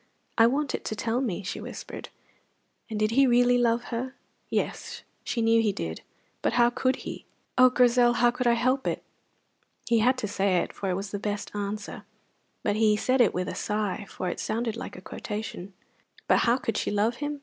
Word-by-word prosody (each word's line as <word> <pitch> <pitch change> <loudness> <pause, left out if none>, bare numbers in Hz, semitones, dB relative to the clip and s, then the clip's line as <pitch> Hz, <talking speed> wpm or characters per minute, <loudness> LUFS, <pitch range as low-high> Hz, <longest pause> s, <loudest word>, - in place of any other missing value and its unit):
"I 225 0 +6
want 280 +3 0
it - - -3
to 215 - -2
tell 230 +4 -1
me," 205 -6 -2
she 185 - -4
whispered. - - -8 0.8
And 215 -1 -3
did 215 0 +2
he 270 +3 +5
really 245 0 +4
love 235 0 +2
her? 255 +3 -3 0.3
Yes, - - -3 0.2
she 230 - -1
knew 225 0 +4
he 215 -2 +2
did, 80 - -5 0.4
but - - +1
how 240 0 +4
could 255 +1 +1
he? - - -6 0.3
"Oh, 255 0 +7
Grizel, 245 -1 +4
how 240 0 +4
could 250 0 -1
I 235 - +5
help 255 +3 +1
it!" - - -2 0.8
He 235 -1 +3
had 250 +4 +3
to 220 - -2
say 195 -1 +1
it, - - -1
for 195 - -3
it 180 - 0
is 195 0 -5
the 205 - -3
best 205 0 -3
answer; 205 0 -4 0.6
but 205 0 +1
he 215 -1 +4
said 255 +4 +2
it 230 - +5
with 180 0 -2
a - - -3
sigh, 210 -1 -2
for 185 - -4
it - - -4
sounded 230 0 -2
like 230 - -7
a 185 - -9
quotation. 205 -1 -6 0.6
But - - +5
how 235 +1 +3
could 225 -4 -2
she - - -1
love 215 +3 +1
him? 290 0 -3
230 Hz, 205 wpm, -27 LUFS, 205-245 Hz, 0.8 s, Oh